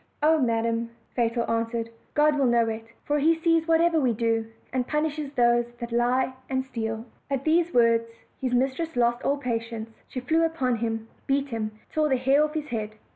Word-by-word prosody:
"Oh, 315 +1 +5
madam," 230 -2 0 0.3
Fatal 235 -1 +1
answered, 230 0 -1 0.2
"God 300 0 +4
will 275 -2 +2
know 235 -1 +3
it; 225 0 -4 0.2
for 295 0 +1
He 325 +3 +4
sees 330 0 +2
whatever 330 0 +4
we 255 -5 +2
do, 225 0 0 0.3
and 255 -1 0
punishes 300 -1 -1
those 240 -1 +2
that 235 -1 -5
lie 245 +2 +2 0.2
and 260 0 -1
steal." 225 -3 -4 0.2
At 275 -1 -1
these 335 +2 +2
words 230 -1 +4 0.3
his 255 -2 0
mistress 270 +6 0
lost 240 0 +2
all 280 - +1
patience; 230 -3 -3 0.2
she 255 - -5
flew 315 +6 +1
npon 255 -8 -1
him, 225 -1 -2 0.2
beat 275 +1 +1
him, 225 -3 -2
and 215 - -24
tore 305 -1 +1
the 265 - +3
hair 270 +4 +4
off 305 +1 -2
his 305 -1 -3
head. 215 -2 -3
250 Hz, 190 wpm, -26 LUFS, 230-295 Hz, 0.3 s, Oh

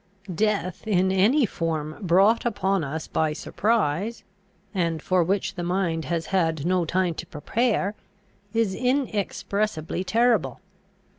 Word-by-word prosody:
Death 205 0 -1
in 190 -2 +2
any 225 +9 +4
form 160 -5 -3
brought 195 +5 +4
upon 195 -5 0
us 155 +3 -4
by 155 -1 0
surprise, 205 +3 -1 0.5
and 170 -4 0
for 185 +3 +2
which 190 +3 -1
the 175 - -5
mind 170 -3 -1
has 165 +3 -2
had 160 -5 +1
no 180 -1 +2
time 180 +1 +1
to 165 - -7
prepare, 205 +6 0 0.6
is 225 -3 +1
inexpressibly 215 - -1
terrible. 230 +3 +2
185 Hz, 125 wpm, -25 LUFS, 165-215 Hz, 0.6 s, any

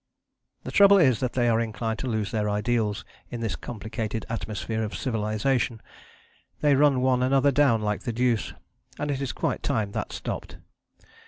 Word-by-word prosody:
The - - -6
trouble 200 0 +7
is 130 - +4
that 125 -2 -2
they 120 -2 +1
are 115 -1 +3
inclined 110 0 -3
to 135 - -3
lose 110 -4 -1
their 105 -1 0
ideals 105 -1 0 0.2
in 120 - -6
this 110 -3 -2
complicated 110 0 -5
atmosphere 110 0 -3
of 105 -1 -3
civilization. 115 +1 -1 0.8
They 145 -1 +4
run 140 -2 +4
one 130 -1 +2
another 135 +2 +3
down 130 -6 +3
like 105 0 -1
the 120 - -3
deuce, 120 -1 0 0.4
and 145 0 -2
it 140 -1 -2
is 135 - -2
quite - - -2
time 110 -8 -1
that - - -4
stopped. - - -6
115 Hz, 170 wpm, -26 LUFS, 110-130 Hz, 0.8 s, trouble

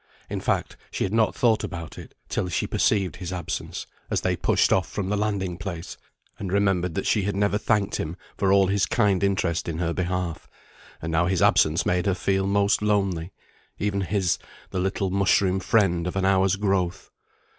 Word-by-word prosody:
In - - -2
fact, - - -1
she - - -2
had 95 - -2
not 110 -1 +2
thought 115 -3 +2
about 85 -4 -6
it, - - -12
till 90 - -2
she 85 - -1
perceived 95 -7 +1
his 90 -1 -6
absence, 90 -3 -4 0.2
as - - 0
they - - +1
pushed - - +2
off 95 - +1
from 95 -2 -3
the 105 - +1
landing 100 -4 -2
place, 85 -2 -6 0.4
and 95 -3 -4
remembered 95 -4 +1
that - - -2
she 105 - +2
had 100 +1 -2
never 100 +1 +1
thanked 105 -3 +1
him 80 +3 -4 0.2
for 95 -1 +1
all 100 0 +5
his 100 +1 +1
kind 100 -5 +2
interest 90 -4 0
in 80 - -3
her 85 -1 -1
behalf; 90 -2 -3 0.5
and 80 - -3
now 85 +2 +2
his 95 -1 +1
absence 80 +2 +4
made 90 +1 +1
her 95 - +2
feel 95 +1 0
most 100 +1 +2
lonely 100 -5 0 0.5
even 100 -1 -1
his, 95 -1 0 0.3
the 95 - -2
little 95 0 -1
mushroom 95 0 +2
friend 95 -5 +2
of 90 - -4
an 95 -1 +1
hour's 95 0 +3
growth. 95 -2 -1
95 Hz, 190 wpm, -25 LUFS, 90-100 Hz, 0.5 s, all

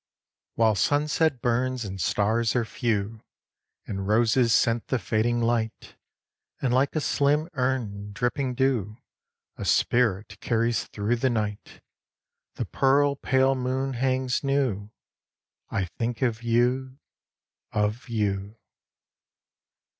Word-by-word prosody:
While 110 -1 +4
sunset 145 - +1
burns 125 0 0
and 95 -1 -5
stars 110 +7 +1
are 120 -2 +1
few, 110 -1 -2 0.6
And 95 -1 -4
roses 115 +2 +3
scent 115 +1 +2
the 130 - +1
fading 115 +3 0
light, 115 -1 -1 0.6
And 125 -3 0
like 135 +4 +2
a - - +2
slim 150 +1 +1
urn, 120 -7 -2
dripping 125 +4 -1
dew, 120 -5 0 0.6
A - - -5
spirit 105 -4 +1
carries 115 0 0
through 110 +4 -1
the 130 +3 +1
night, 105 -3 -3 0.7
The - - -3
pearl 140 +1 +2
pale 135 0 +2
moon 130 +1 -2
hangs 130 +1 0
new, 130 -8 0 0.8
I 95 - -1
think 115 +7 -3
of 115 -3 0
you, 125 +3 +1 0.7
of 105 +4 -1
you. 105 -1 -2
120 Hz, 115 wpm, -26 LUFS, 110-130 Hz, 0.8 s, While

